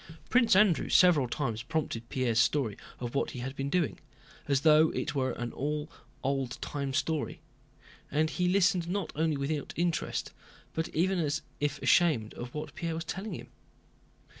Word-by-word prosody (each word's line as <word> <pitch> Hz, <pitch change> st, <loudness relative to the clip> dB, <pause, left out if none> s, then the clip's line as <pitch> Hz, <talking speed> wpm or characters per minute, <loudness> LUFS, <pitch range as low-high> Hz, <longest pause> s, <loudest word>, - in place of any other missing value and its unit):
Prince 235 Hz, -4 st, +5 dB
Andrew 195 Hz, -4 st, +4 dB
several 170 Hz, -8 st, +5 dB
times 120 Hz, -4 st, -2 dB
prompted 140 Hz, -7 st, -3 dB
Pierre's 120 Hz, -4 st, +1 dB
story 120 Hz, -5 st, +2 dB, 0.2 s
of 120 Hz, -1 st, -4 dB
what 140 Hz, -, 0 dB
he 125 Hz, -, -7 dB
had 130 Hz, +2 st, -5 dB
been 135 Hz, 0 st, -2 dB
doing, 170 Hz, 0 st, 0 dB, 0.5 s
as 140 Hz, -2 st, +2 dB
though 155 Hz, 0 st, +6 dB
it -, -, -2 dB
were 130 Hz, -3 st, 0 dB
all 145 Hz, +5 st, -2 dB
an 155 Hz, -, -14 dB, 0.3 s
old 135 Hz, -2 st, -1 dB
time 140 Hz, -2 st, -3 dB
story, 155 Hz, +3 st, -1 dB, 0.7 s
and 155 Hz, +2 st, +1 dB
he 180 Hz, -1 st, 0 dB
listened 180 Hz, -2 st, +3 dB
not 190 Hz, -2 st, -2 dB
only 160 Hz, -1 st, +1 dB
without 140 Hz, +1 st, -2 dB
interest 170 Hz, -1 st, -1 dB, 0.4 s
but 160 Hz, 0 st, -2 dB
even 185 Hz, +3 st, +1 dB
as 155 Hz, -2 st, -1 dB, 0.2 s
if 145 Hz, 0 st, -1 dB
ashamed 140 Hz, -11 st, +3 dB
of 120 Hz, 0 st, -7 dB
what 150 Hz, -, -5 dB
Pierre 170 Hz, -4 st, -3 dB
was 165 Hz, +1 st, -4 dB
telling 195 Hz, +6 st, -4 dB
him. -, -, -9 dB
150 Hz, 165 wpm, -30 LUFS, 135-170 Hz, 0.7 s, though